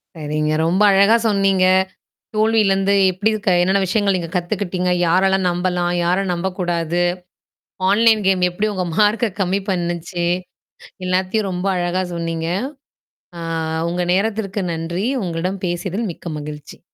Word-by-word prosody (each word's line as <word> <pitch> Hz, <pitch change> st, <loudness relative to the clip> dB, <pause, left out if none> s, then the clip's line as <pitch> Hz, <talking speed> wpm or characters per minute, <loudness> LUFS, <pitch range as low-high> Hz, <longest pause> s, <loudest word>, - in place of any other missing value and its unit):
சரிங்க, 155 Hz, 0 st, -2 dB
ரொம்ப 185 Hz, +5 st, +1 dB
அழகா 200 Hz, +4 st, +5 dB
சொன்னீங்க. 195 Hz, -2 st, +2 dB, 0.7 s
தோல்வியிலிருந்து 205 Hz, -3 st, +2 dB, 0.2 s
எப்படி 205 Hz, +4 st, 0 dB, 0.2 s
க -, -, +4 dB
என்னன்ன 190 Hz, +2 st, +2 dB
விஷயங்களை 200 Hz, 0 st, +1 dB
நீங்கக் 170 Hz, 0 st, -4 dB
கத்துக்கிட்டீங்க? 180 Hz, 0 st, -1 dB, 0.2 s
யாரெல்லாம் 190 Hz, +2 st, +2 dB
நம்பலாம்? 175 Hz, 0 st, -1 dB
யாரை 180 Hz, +3 st, +2 dB
நம்பக் 180 Hz, +2 st, -3 dB
கூடாது? 175 Hz, -1 st, 0 dB, 0.9 s
ஆன்லைன் 220 Hz, +1 st, +4 dB
கேம் 190 Hz, -1 st, +3 dB
எப்படி 205 Hz, +5 st, -1 dB
உங்க 185 Hz, -1 st, -1 dB
மார்க்க 215 Hz, 0 st, +2 dB
கம்மி 190 Hz, +1 st, +1 dB
பண்ணுச்சு? 175 Hz, -1 st, -2 dB, 0.8 s
எல்லாத்தையும் 185 Hz, +3 st, 0 dB
ரொம்ப 180 Hz, +1 st, -3 dB
அழகா 175 Hz, +1 st, 0 dB
சொன்னீங்க. 165 Hz, -1 st, -3 dB, 0.9 s
அ -, -, -6 dB, 0.5 s
உங்க 180 Hz, +1 st, -1 dB
நேரத்திற்கு 205 Hz, 0 st, -1 dB
நன்றி! 170 Hz, +5 st, -3 dB, 0.2 s
உங்களிடம் 180 Hz, +3 st, -3 dB
பேசியதில் 190 Hz, +5 st, -2 dB
மிக்க 170 Hz, -, -10 dB
மகிழ்ச்சி. 150 Hz, 0 st, -9 dB
185 Hz, 125 wpm, -19 LUFS, 175-200 Hz, 0.9 s, அழகா